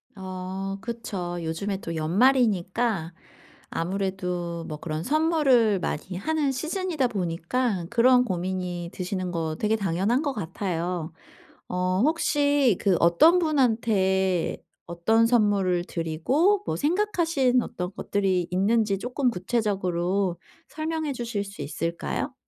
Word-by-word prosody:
아 190 0 -5
그쵸. 195 -6 -4
요즘에 180 +5 -2
또 165 - -5
연말이니까 195 0 +2 0.6
아무래도 180 -2 -3
뭐 155 - -5
그런 155 0 -4
선물을 275 - +3
많이 180 +2 -4
하는 300 +6 0
시즌이다 315 0 -1
보니까 190 +1 -1
그런 250 +1 +5
고민이 180 -3 -3
드시는 185 -1 -3
거 160 -2 -2
되게 215 +1 +2
당연한 200 - 0
것 285 -3 -1
같아요. 175 -4 -3 0.6
어 185 +1 0
혹시 285 - +2
그 195 -4 +3
어떤 175 - +5
분한테 220 - +1 0.3
어떤 220 +7 +2
선물을 200 -6 +2
드리고 255 - +1
뭐 - - -1
생각하신 325 -7 +1
어떤 180 -4 -5
것들이 190 -5 0
있는지 200 +2 +2
쪼끔 250 +3 0
구체적으로 185 -3 -1 0.3
설명해 315 -2 -3
주실 235 -5 -3
수 200 -5 -9
있을까요? 165 +4 -3
195 Hz, 260 characters per minute, -26 LUFS, 180-250 Hz, 0.6 s, 그런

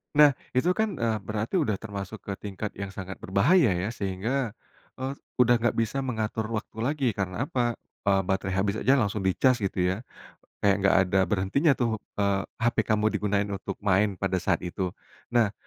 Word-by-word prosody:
Nah, 150 -1 +8 0.2
itu 170 +8 +3
kan, 215 -2 0
eee, 115 -3 0
berarti 110 - -1
udah 110 -10 +1
termasuk 100 0 -7
ke 100 - -4
tingkat 105 +1 -5
yang 100 - -3
sangat 95 0 -7
berbahaya, 115 - +3
ya. 95 +5 -2
Sehingga, 110 +4 -2 0.4
eee, 130 +1 -3 0.2
udah 120 -1 +5
nggak 120 -1 +1
bisa 115 +4 0
mengatur 110 -4 -2
waktu 105 - -6
lagi. 135 +2 0
Karena 95 +3 -2
apa? 120 -4 0 0.3
Eee, 95 -1 +4
baterai 95 0 -1
habis 100 +2 0
aja 135 +2 +4
langsung 105 -4 +1
dicas, 125 +6 +3
gitu, 95 -2 -1
ya. 95 - -1 0.6
Kayak 100 -1 +3
enggak 95 -1 +4
ada 95 +1 +2
berhentinya, 105 - +2
tuh. 115 -3 0 0.2
Eee, 100 -1 +2 0.2
HP 120 +1 +2
kamu 110 -1 +1
digunain 100 -1 +1
untuk 100 -1 -5
main 100 0 +2
pada 95 -1 -1
saat 95 -2 +2
itu. 90 +1 -2 0.4
Nah, 115 -4 +2
105 Hz, 175 wpm, -27 LUFS, 95-120 Hz, 0.6 s, Nah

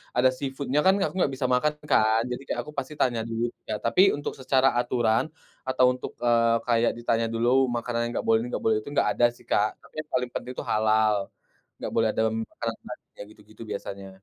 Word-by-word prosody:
ada 125 +1 +5
seafood-nya 140 0 -2
kan 190 - +6
aku - - -4
enggak 140 - +2
bisa 130 - -1
makan 150 +4 +2 0.2
kan. 110 +1 +4
Jadi, 125 - -4
kayak - - -2
aku 150 - -9
pasti 140 +2 -3
tanya 120 -3 +1
dulu, 115 +1 -1 0.2
ya - - 0
tapi 115 +10 +3 0.2
untuk 145 - -4
secara 130 0 +3
aturan, 120 +1 +1 0.4
atau 130 -1 +3
untuk, 125 - -7
eee, 115 -1 +4
kayak 115 0 +3
ditanya 115 -1 0
dulu 115 +1 +1 0.2
makanan 120 0 -2
enggak - - -1
boleh 110 0 +4
ini, 120 - -5
enggak - - -3
boleh 110 -1 +3
itu, 145 - -9
enggak - - +2
ada 120 - +3
sih - - -20
Kak, 105 +1 +3 0.2
tapi - - -20
yang 150 - -20
paling 125 -1 0
penting 125 - -5
itu - - -3
halal. 110 -2 +2 0.5
Enggak - - -5
boleh 115 -1 +3
dalam 110 0 +1
makanan - - -5
babinya - - -10
gitu-gitu 110 +1 -17
biasanya. 100 -1 -6
120 Hz, 205 wpm, -26 LUFS, 110-130 Hz, 0.5 s, kan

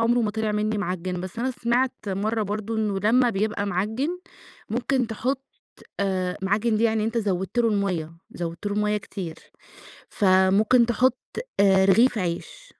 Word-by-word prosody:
عُمره 235 +2 +3
ما 215 -2 0
طِلِع 220 0 -1
منّي 210 0 0
معجّن، 180 -1 -3
بس 185 +4 -7
أنا 255 +3 0
سمعت 245 +1 0 0.2
مَرّة 215 +3 -1
برضه 215 +2 -3
إنه 210 -3 0
لمّا 240 +4 +3
بيبقى 205 0 -1
معجّن، 220 - -2 0.5
ممكن 250 +1 0
تحط 255 +5 -2 0.6
آآ 185 -2 -1
معجّن 215 +3 +1
دي 220 - 0
يعني 220 -1 +2
أنت 230 +1 -1
زوّدت 195 +1 -2
له 230 -1 +4
المَيّة، 185 -6 -1 0.2
زوّدت 170 +2 -5
له 205 - -1
المَيّة 210 0 +1
كتير، 190 -5 -6 0.7
فممكن 200 +5 +4
تحط 250 +2 +2 0.4
آآ 190 -1 +5
رغيف 225 +4 +4
عيش. 170 -2 -4
210 Hz, 155 wpm, -24 LUFS, 190-230 Hz, 0.7 s, آآ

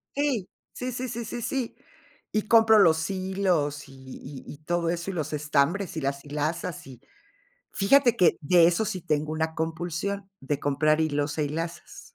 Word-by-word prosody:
Sí. 275 -9 0 0.2
Sí, 250 0 -4
sí, 255 +1 -3
sí, 235 0 -4
sí, 240 +2 -5
sí. 255 0 -3 0.6
Y 215 - 0
compro 225 -1 +6
los 160 -2 +4
hilos 185 -7 -1
y 135 - -14
y 130 +1 -10
y 145 - -12
todo 170 +1 0
eso 170 +2 -2
y - - -8
los 155 -3 -3
estambres 150 +5 0
y - - -2
las 140 0 -2
hilazas. 160 +4 -3
Y 125 -2 -12 0.7
fíjate 240 +4 +4
que 175 -3 +4
de 170 +3 +5
eso 175 +5 +1
sí 190 -4 -3
tengo 155 -2 -1
una 160 0 -2
compulsión, 175 +5 -3
de 140 +1 -2
comprar 155 +2 +2
hilos 145 -1 -1
e 150 - +1
hilazas. 165 +3 -5
165 Hz, 175 wpm, -26 LUFS, 150-195 Hz, 0.7 s, compro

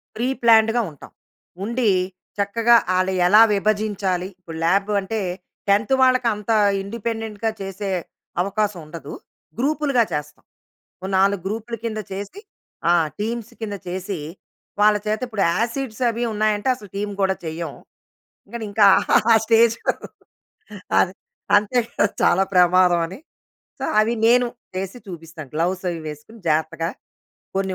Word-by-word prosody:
Pre 235 +3 -1
ప్లాన్డ్‌గా 225 0 +5
ఉంటాం. 145 - -14 0.5
ఉండి, 235 +1 +1 0.5
చక్కగా 230 +4 +3 0.2
ఆళ్ళు 185 +1 +1
ఎలా 210 +4 +7
విభజించాలి. 200 -3 0
ఇప్పుడు 165 -3 -9
ల్యాబ్ 195 +4 +2
అంటే 220 +3 -3 0.5
10థ్ 210 +5 +3
వాళ్ళకి 255 -1 +4
అంత 210 +2 -4 0.3
ఇండిపెండెంట్‌గా 225 +1 -3
చేసే 195 +1 -5 0.5
అవకాశం 200 0 -1
ఉండదు. 155 -2 -9 0.5
గ్రూప్‌లుగా 280 -2 +2
చేస్తాం. 150 0 -5 0.6
ఓ - - -3
4 195 0 +3
గ్రూప్‌ల 225 +3 -4
కింద 215 -1 -2
చేసి 200 - -7 0.5
ఆ! - - +6 0.3
టీమ్స్ 230 +2 -3
కింద 205 -2 -3
చేసి 185 +2 -4 0.6
వాళ్ళ 210 0 +6
చేత 215 0 0
ఇప్పుడు 220 -4 -1
యాసిడ్స్ 235 +2 -2
అవి 235 +1 -2
ఉన్నాయంటే, 215 +2 +1
అసలు 210 -5 -13
టీమ్ 205 +1 -3
కూడా 190 0 +2
చెయ్యం. 160 -1 -4 0.8
కానీ 235 -2 -4
ఇంకా 205 -1 +5 0.4
ఆ - - +9
స్టేజ్ 230 0 +4 1.2
అదే 185 - +2 0.4
అంతే 210 +4 +1 0.4
చాలా 190 - +4
ప్రమాదం 180 -1 +5
అని. 190 +8 -10 0.6
సో, - - -2
అవి 220 +2 +2
నేను 245 +1 +5 0.3
చేసి 195 +5 -4
చూపిస్తాను. 160 -5 -9
గ్లోవ్స్ 180 +3 -1
అవి 165 - -5
వేసుకొని 155 +10 -10
జాగ్రత్తగా 160 +1 0 0.7
కొన్ని 190 -1 -1
205 Hz, 125 wpm, -22 LUFS, 185-225 Hz, 1.2 s, ఆ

